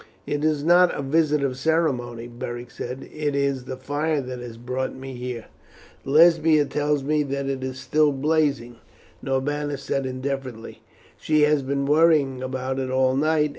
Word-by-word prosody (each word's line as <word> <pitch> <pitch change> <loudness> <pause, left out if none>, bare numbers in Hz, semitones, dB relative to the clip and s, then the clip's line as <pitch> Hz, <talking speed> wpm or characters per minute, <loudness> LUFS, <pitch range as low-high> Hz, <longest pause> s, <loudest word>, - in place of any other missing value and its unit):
"It 145 0 -2
is 155 -2 +1
not 175 +2 +5
a 140 - -3
visit 150 +1 +2
of 130 -2 -1
ceremony," 130 -7 0
Beric 120 0 -7
said; 125 +4 -6
"it 150 -2 -2
is 140 -2 0
the 130 - -6
fire 145 +3 -1
that 130 -2 -5
has 120 -2 -8
brought 125 +2 -3
me 135 0 -8
here." 125 -2 -6 0.6
"Lesbia 155 0 +5
tells 145 0 0
me 150 +2 +1
that 140 -1 -2
it 135 -1 -3
is 130 0 -4
still 150 +1 +2
blazing," 140 -4 0 0.4
Norbanus 145 +1 -2
said 135 0 -1
indifferently. 130 -3 -5 0.4
"She 155 -1 +1
has 150 -1 +3
been 140 +1 -1
worrying 150 -3 +3
about 130 0 -3
it 130 -1 -2
all 130 0 +2
night. 150 +1 +2
140 Hz, 165 wpm, -24 LUFS, 130-150 Hz, 0.6 s, not